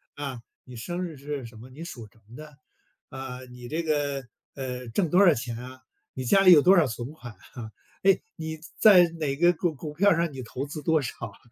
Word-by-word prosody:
“啊， 135 -4 -6 0.2
你 125 - -11
生 175 +11 -4
日 165 -3 -8
是 140 -1 -5
什 115 -1 -12
么？ 120 +4 -12
你 135 +5 -12
属 120 -9 -8
什 110 - -25
么 115 - -14
的？ 150 0 -12 0.5
啊， 130 -2 -7
你 125 -1 -11
这 160 +3 -1
个， 145 -4 -1 0.3
呃， 125 -2 -5
挣 170 - 0
多 185 +5 +5
少 175 - +7
钱 120 -2 -5
啊？ 130 +2 -10 0.3
你 130 - -5
家 195 +11 +4
里 185 -1 +7
有 155 -4 +9
多 185 +6 +6
少 170 -4 +5
存 120 +2 -5
款 120 -7 -11 0.2
啊？ 110 -3 -8 0.3
哎， 195 0 +5 0.2
你 160 0 -6 0.2
在 190 -5 +8
哪 145 -3 -1
个 175 +2 +4
股 170 0 -1
股 150 +1 -8
票 200 +6 +4
上 170 -1 0
你 130 -1 -7
投 125 +3 -5
资 150 +1 -7
多 160 -2 +2
少 130 - -4
啊？” 100 - -15
145 Hz, 240 characters per minute, -26 LUFS, 125-165 Hz, 0.5 s, 有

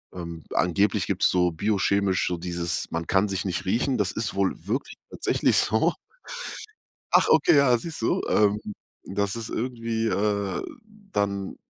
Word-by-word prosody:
ähm, 85 -3 -7
angeblich 100 +3 +2
gibt's 95 -1 +2
so 90 -1 +2
biochemisch 100 +1 +1
so 90 - -1
dieses 85 0 -3
man 85 0 -3
kann 95 +2 +2
sich 95 -1 -3
nicht 90 -2 -2
riechen, 120 +6 +1
das 95 -3 +1
ist 110 +1 -3
wohl 95 -1 +1
wirklich 120 +8 -3 0.2
tatsächlich - - +1
so. - - +2 1.2
Ach, - - +5
okay, - - +5
ja, 140 -3 +5
siehst 160 0 -7
du? - - +1
Ähm, 105 0 +3 0.4
dass 100 +1 -2
es 115 -1 -5
irgendwie, 115 -2 -2
äh 100 -2 0 0.5
dann, 100 - -1
100 Hz, 150 wpm, -25 LUFS, 90-110 Hz, 1.2 s, Ach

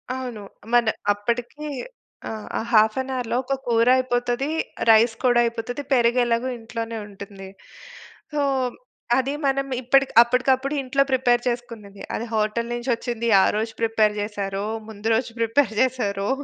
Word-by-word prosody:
అవును. 250 -5 -6 0.3
మన్ 235 -2 +4 0.2
అప్పటికి 235 +8 -4 0.6
ఆ! - - -4 0.4
హాఫ్ 215 -1 +5
ఎన్ 265 0 -6
అవర్‌లో 245 -2 -2
ఒక 275 - -2
కూర 230 0 +3
అయిపోతది. 245 +1 -1 0.4
రైస్ 225 +1 +6
కూడా 245 -2 +4
అయిపోతది. 235 +3 -4
పెరుగెలాగో 240 0 +2
ఇంట్లోనే 225 0 -5
ఉంటుంది. 200 -1 -10 0.9
సో, 295 - 0 0.8
అది 265 +2 0
మనం 275 0 +1
ఇప్పడిక్ 270 +2 +3
అప్పటికప్పుడు 260 +3 +1
ఇంట్లో 275 +1 +1
ప్రిపేర్ 245 -2 +3
చేసుకున్నది. 230 -5 -7
అది 235 - -4
హోటలు 215 +2 0
నుంచొచ్చింది, 240 -1 -2
ఆ - - +4
రోజు 225 +1 -2
ప్రిపేర్ 220 -2 +2
జేశారో! 200 -1 -3 0.2
ముందు 220 +1 -4
రోజు 240 0 -1
ప్రిపేర్ 230 +1 +2
జేసారో! 220 -6 0
235 Hz, 130 wpm, -23 LUFS, 220-255 Hz, 0.9 s, రైస్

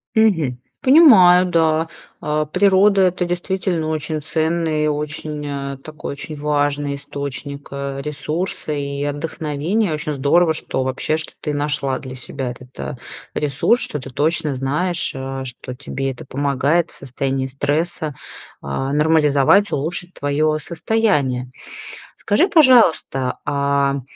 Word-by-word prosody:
Мгм. 165 - +2 0.2
Понимаю, 215 - +7
да. 160 -2 +2 0.3
А, 150 0 0
природа- 195 +4 +4
это 180 -1 +2
действительно 175 -2 -2
очень 155 0 -2
ценный 160 0 0
и - - +2
очень, 150 0 -3
а, 140 -1 -4
такой 155 +2 -8
очень 155 +2 -6
важный 145 -1 0
источник, 140 0 -6
а, 140 0 -4
ресурса 155 +4 -4
и 140 -1 -3
отдохновения. 155 +6 -1
Очень 150 0 -2
здорово, 160 +5 +3
что, 130 -3 -3
вообще, 130 +4 -1
что 160 - -7
ты 150 - -2
нашла 145 -3 -1
для 130 -1 -8
себя 130 0 -4
этот, 125 +1 -12
а, - - -4 0.4
ресурс, 150 - +1
что 150 - -3
ты 130 - -9
точно 155 +2 0
знаешь, 150 +7 -1
а, 135 0 -5
что 125 0 -8
тебе 135 0 -3
это 125 - -10
помогает 140 +5 0
в - - -16
состоянии 135 0 -2
стресса, 150 +3 -2 0.5
а, 135 - -3
нормализовать, 150 +5 +4
улучшить 175 +5 -3
твое 155 +2 0
состояние. 150 - 0 0.6
Скажи, 260 - +2
пожалуйста, 225 - +4
а 140 -1 +1
150 Hz, 130 wpm, -20 LUFS, 140-170 Hz, 0.6 s, Понимаю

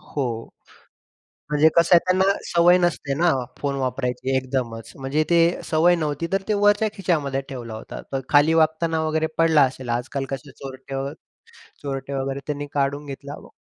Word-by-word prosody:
हो. 120 -5 -3 1.1
म्हणजे 150 +1 +5
कसं 170 +2 +5
आहे, 170 - +9
त्यांना 185 +1 +2 0.2
सवय 175 +1 +4
नसते 170 -5 0
ना, 170 +3 +3 0.3
फोन 140 -1 -2
वापरायची 130 0 -1
एकदमच. 125 -4 -3
म्हणजे 140 +4 0
ते 170 - +5 0.3
सवय 165 +3 +4
नव्हती. 155 0 -2
तर 195 0 +1
ते 210 - +2
वरच्या 205 +1 +4
खिच्यामध्ये 150 -8 -1
ठेवला 120 -4 -7
होता, 110 - -8
तर 135 - -1
खाली 150 +2 +5
वागताना 160 0 +2
वगैरे 160 0 0
पडला 160 -3 +5
असेल. 130 -1 -1
आजकाल 135 +2 -4
कसे 140 +1 -6
चोरटे 135 0 -9
व 135 +1 -3 0.7
चोरटे 135 0 -4
वगैरे 135 0 -3
त्यानी 145 -1 -3
काढून 140 +1 -1
घेतला 140 +1 -7
व - - -13
145 Hz, 165 wpm, -23 LUFS, 135-160 Hz, 1.1 s, आहे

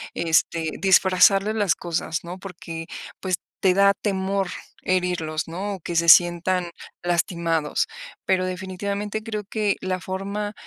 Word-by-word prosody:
este, 165 -1 +1
disfrazarles 195 +2 +4
las 205 -5 +2
cosas, 165 -1 -3
¿no?, 175 +2 -6
porque, 165 -3 -8 0.3
pues, 185 -1 0 0.3
te 190 -2 +4
da 200 0 +5
temor 195 -1 -1 0.3
herirlos, 180 -4 -1
¿no?, 195 +5 -4
o - - -11
que 170 - -5
se 170 0 +3
sientan 175 +1 +5 0.3
lastimados. 170 -3 0 0.4
Pero 185 -1 +2
definitivamente 200 +3 -4
creo 215 -2 -4
que 210 0 0
la 185 0 -2
forma 200 +3 -4
185 Hz, 130 wpm, -24 LUFS, 170-200 Hz, 0.4 s, da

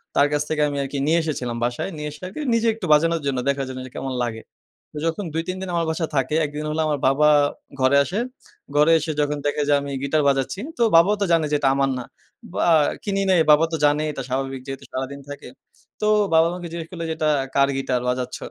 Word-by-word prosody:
তার 140 - +5
কাছ 145 - +1
থেকে 155 -1 0
আমি 145 -1 -3
আরকি 135 +1 -5
নিয়ে 165 +2 +3
এসেছিলাম 125 -7 -3
বাসায়। 120 +8 -2
নিয়ে 150 0 -4
এসে, 150 - -13
আর - - -9 0.2
নিজে 230 0 +2
একটু 220 -3 -6
বাজানোর 165 +2 +3
জন্য, 135 -2 0
দেখার 140 -1 0
জন্য 130 0 -6
যে, 130 - -11
কেমন 135 -1 -4
লাগে? 110 -2 -4 0.6
যখন 165 +5 -2
২ 165 +1 -1
৩ 185 - -2
দিন 190 - -5
আমার 170 -1 +1
বাসায় 160 0 -2
থাকে, 135 +3 0
১ - - -4
দিন 150 +1 -4
হল 155 - -2
আমার 150 -2 -1
বাবা 150 +3 +4 0.5
ঘরে 130 +2 +4
আসে। 185 +8 -3 0.6
ঘরে 150 +2 +5
এসে 155 +1 -3
যখন 150 0 0
দেখে 145 +1 0
যে - - +5
আমি 140 0 -6
গিটার 150 +2 +1
বাজাচ্ছি, 135 +6 0 0.2
তো - - +3
বাবাও 175 +6 +6
তো - - +3
জানে 165 -2 +3
যে - - +3
এটা 135 - +3
আমার 135 0 +2
না। 125 - -4 0.5
বা - - 0 0.4
কিনি 195 -1 0
নাই, 185 -2 +5
বাবা 150 +2 +6
তো - - 0
জানে 145 +1 +3
এটা 135 -2 -5
স্বাভাবিক, 135 +1 -2
যেহেতু 135 0 -6
সারাদিন 135 +2 -4
থাকে। 145 0 -8 0.5
তো - - +1 0.3
বাবা 160 0 +6
আমাকে 175 -1 -6
জিজ্ঞেস 165 -1 -6
করলো 170 -2 -6
যে, - - 0
"এটা 155 -1 +1 0.3
কার 140 0 +4
গিটার 130 -2 -1
বাজাচ্ছ?" 125 0 -2
150 Hz, 230 wpm, -22 LUFS, 135-165 Hz, 0.6 s, বাবাও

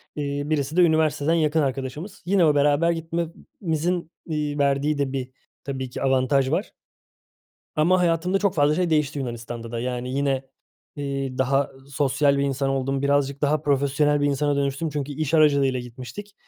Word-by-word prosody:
eee, 145 -1 -2
birisi 150 +1 -1
de - - +7
üniversiteden 160 -2 +3
yakın 160 -1 +2
arkadaşımız. 135 +7 -4
Yine 185 -2 +3
o 150 - +3
beraber 145 +3 +3
gitmemizin, 165 +1 -3
iii, 150 -2 -2
verdiği 140 +1 +2
de 140 -2 -1
bir 130 -2 -3 0.3
tabii 130 -2 -4
ki - - -7
avantaj 135 0 +2
var - - -1 1.0
ama 175 +4 +4
hayatımda 175 +2 +1
çok 200 -2 +1
fazla 145 0 +3
şey 180 0 0
değişti 150 -2 +1
Yunanistan'da 120 -2 -5
da. 115 - -2
Yani, 125 0 -3
yine, 135 -1 0 0.5
eee, 135 -2 -3
daha 135 +2 +1 0.2
sosyal 140 0 +2
bir - - +1
insan 140 0 0
oldum, 135 0 -1
birazcık 140 0 +1
daha 150 +1 +2
profesyonel 145 +1 +2
bir 145 - +2
insana 145 0 +1
dönüştüm 140 +3 -1
çünkü 145 -1 -3
iş 155 +2 -2
aracılığıyla 140 -4 +4
gitmiştik. 125 - -9
145 Hz, 160 wpm, -24 LUFS, 135-155 Hz, 1.0 s, de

